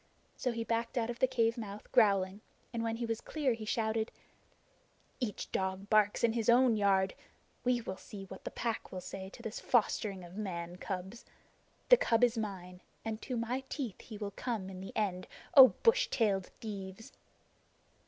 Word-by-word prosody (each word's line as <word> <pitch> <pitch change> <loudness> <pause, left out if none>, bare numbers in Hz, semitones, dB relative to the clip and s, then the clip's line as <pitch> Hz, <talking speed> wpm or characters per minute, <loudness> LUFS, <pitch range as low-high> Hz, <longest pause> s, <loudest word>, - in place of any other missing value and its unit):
So 250 - -1
he 230 -1 -3
backed 230 +2 -1
out 235 0 +1
of 235 - -9
the 260 - +5
cave 230 -1 +1
mouth 210 -1 -8
growling, 200 -3 +3 0.3
and 230 - -1
when 225 0 -1
he 235 +1 -3
was 225 -1 -2
clear 290 -5 0
he 225 -1 -6
shouted: 220 0 0 1.1
"Each 235 -6 -3
dog 190 +1 -2
barks 210 0 +4
in 230 -1 +4
his 230 -1 0
own 245 -1 +6
yard! 195 -2 +3 0.5
We 245 -1 +2
will 190 -4 -5
see 200 -2 -9
what 190 0 -10
the - - -3
Pack 230 -2 -3
will 185 - -4
say 190 +1 -7
to 235 - -13
this 220 -2 -4
fostering 205 -5 +1
of 175 0 -11
man 175 -4 -4
cubs. 190 +4 -5 0.7
The - - +10
cub 235 - +2
is 245 -1 +5
mine, 185 -5 -5 0.2
and 220 0 -3
to 250 - -3
my 245 +3 -2
teeth 250 -10 -4
he 220 - -9
will 205 -1 -4
come 205 -3 -3
in 185 -1 -8
the 195 - -7
end, 190 -4 -1 0.3
O 265 -2 +12 0.2
bush - - +5
tailed 200 - +1
thieves!" 200 -1 -7
220 Hz, 185 wpm, -33 LUFS, 195-235 Hz, 1.1 s, O